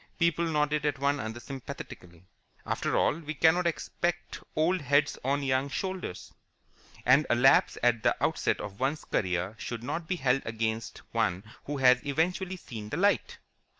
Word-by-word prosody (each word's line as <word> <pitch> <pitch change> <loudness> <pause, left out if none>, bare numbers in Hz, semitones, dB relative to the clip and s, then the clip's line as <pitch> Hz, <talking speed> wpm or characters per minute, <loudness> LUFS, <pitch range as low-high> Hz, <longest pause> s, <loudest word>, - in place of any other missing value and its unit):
People 170 0 +2
nodded 150 -1 +1
at 145 -2 0
one 140 +1 +1
another 110 +2 -5
sympathetically. 95 -9 -9 0.4
After - - -1
all, 155 - +2
we 155 -1 -6
cannot 170 +3 +4
expect 175 +1 -2 0.2
old 170 +4 +2
heads 145 +1 +2
on 140 +2 0
young 135 +1 +1
shoulders, 185 - -5 0.7
and 135 +5 +5
a - - +4
lapse 135 +3 +5
at 120 -2 +3
the - - +3
outset - - +1
of 100 0 -7
one's 140 +4 -1
career 90 0 -1
should 120 -1 -5
not 160 +6 -4
be 185 - 0
held 135 -4 +1
against 110 0 -3
one 90 +2 0 0.2
who 145 0 -3
has 125 -1 +5
eventually 180 +6 -1
seen 110 -10 -8
the - - -3
light. 200 +2 +1
140 Hz, 160 wpm, -29 LUFS, 120-160 Hz, 0.7 s, and